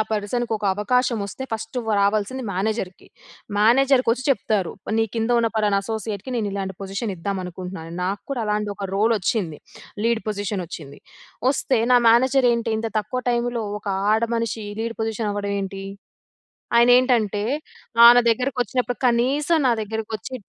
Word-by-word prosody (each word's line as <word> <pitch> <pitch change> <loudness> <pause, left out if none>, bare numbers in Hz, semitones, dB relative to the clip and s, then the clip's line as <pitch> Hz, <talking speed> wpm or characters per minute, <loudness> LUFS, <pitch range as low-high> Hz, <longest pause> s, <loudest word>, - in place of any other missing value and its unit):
పర్సన్‌కొక 220 +1 -2
అవకాశం 240 +4 +1
వస్తే, 200 +7 -7
ఫస్టు 225 +3 -4
వ్ - - -4
రావల్సింది 210 +5 0
మేనేజర్‌కి. 195 -1 -3 0.5
మేనేజర్‌కొచ్చి 250 +2 +3
చెప్తారు. 215 -8 +1 0.3
నీ 225 - +3
కింద 225 +1 -1
ఉన్న 230 -1 +2
పలానా 205 -2 +2
అసోసియేట్‌కి, 220 +1 -4
నేనిలాంటి 200 -3 -3
పొజిషనిద్దామనుకుంటున్నాను. 185 -4 -5
నాకు 195 +2 -2
కూడా 245 -4 -1
అలాంటి 210 0 -1
ఒక 200 - -4
రోలొచ్చింది. 200 -5 0 0.5
లీడ్ 230 -1 +1
పొజిషనొచ్చింది. 180 -8 -5 0.5
వొస్తే, 270 -2 +1
నా 245 - +7
మేనేజరేంటి 240 -1 +3
ఇంత 225 +1 -2
తక్కువ 215 +5 -3
టైములో, 240 -1 -1 0.2
ఒక 215 - -28 0.3
ఆడమనిషి 230 -1 -1 0.2
లీడ్ 230 0 -3
పొజిషన్ 220 -1 -2
అవ్వడం 205 0 -3
ఏంటి? 195 0 -5 0.9
ఆయనేంటంటే, 235 -4 +4 0.6
ఆహ్, 235 +1 +11
నా - - +7
దగ్గరకొచ్చినప్పుడు, 250 0 -1
కనీసం 275 +7 +2
నా 240 - +4
దగ్గరకొచ్చి 220 +2 -5
220 Hz, 125 wpm, -22 LUFS, 200-240 Hz, 0.9 s, ఆహ్